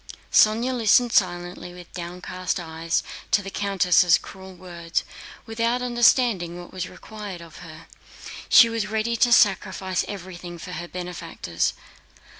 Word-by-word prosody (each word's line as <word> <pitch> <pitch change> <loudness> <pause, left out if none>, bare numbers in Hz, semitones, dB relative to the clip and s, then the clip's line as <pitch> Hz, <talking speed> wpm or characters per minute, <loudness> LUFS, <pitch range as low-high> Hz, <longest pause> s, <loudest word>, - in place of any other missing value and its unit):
Sónya 230 +4 +4
listened 235 +1 +3
silently 175 -1 -1
with 175 -1 -13
downcast 180 +1 -4
eyes 165 0 -2 0.3
to 205 - +2
the 195 - -7
countess' 180 -4 +3
cruel 190 0 -11
words, 170 -2 -4 0.4
without 230 +2 -1
understanding 240 -7 +2
what 175 - -11
was 185 -1 -4
required 210 -4 -9
of 170 -1 -13
her. 165 -1 -12 0.6
She 245 - +8
was 230 -2 -2
ready 220 +2 -1
to 240 +1 +3
sacrifice 190 -4 +2
everything 180 -3 -8
for 180 - -9
her 175 -1 -6
benefactors. 170 - -3
185 Hz, 130 wpm, -24 LUFS, 175-220 Hz, 0.6 s, She